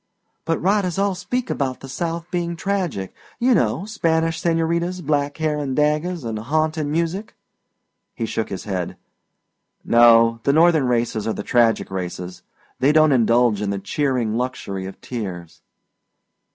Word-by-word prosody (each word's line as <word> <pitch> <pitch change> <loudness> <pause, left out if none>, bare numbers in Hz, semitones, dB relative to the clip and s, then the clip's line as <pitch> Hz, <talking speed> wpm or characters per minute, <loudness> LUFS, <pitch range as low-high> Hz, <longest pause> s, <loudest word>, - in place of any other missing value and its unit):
"But 165 0 0
writers 190 -1 +1
all 200 0 +1
speak 185 +8 -3
about 130 -2 -2
the 135 - -8
South 165 +4 -3
being 170 -1 -2
tragic. 175 - -2 0.2
You 250 +1 +3
know 125 - +1
Spanish 165 -6 0
señoritas, 170 +2 0
black 145 -1 0
hair 155 -2 0
and 135 -3 -2
daggers 150 +1 0
an' 110 -1 -3
haunting 155 +5 -1
music." 170 +6 -2 0.8
He 115 - -2
shook 110 0 -3
his 95 - -5
head. 95 -4 -4 0.9
"No, 115 -1 +6
the 140 - +2
Northern 160 -3 +4
races 115 -3 0
are 110 - 0
the - - -5
tragic 115 -4 +2
races 90 -1 -5 0.4
they 135 +3 +4
don't 155 0 +5
indulge 120 -3 +3
in 105 - -1
the 100 - -1
cheering 125 0 -1
luxury 100 -6 -4
of 95 - -10
tears." 95 -9 -6
145 Hz, 150 wpm, -21 LUFS, 115-170 Hz, 0.9 s, No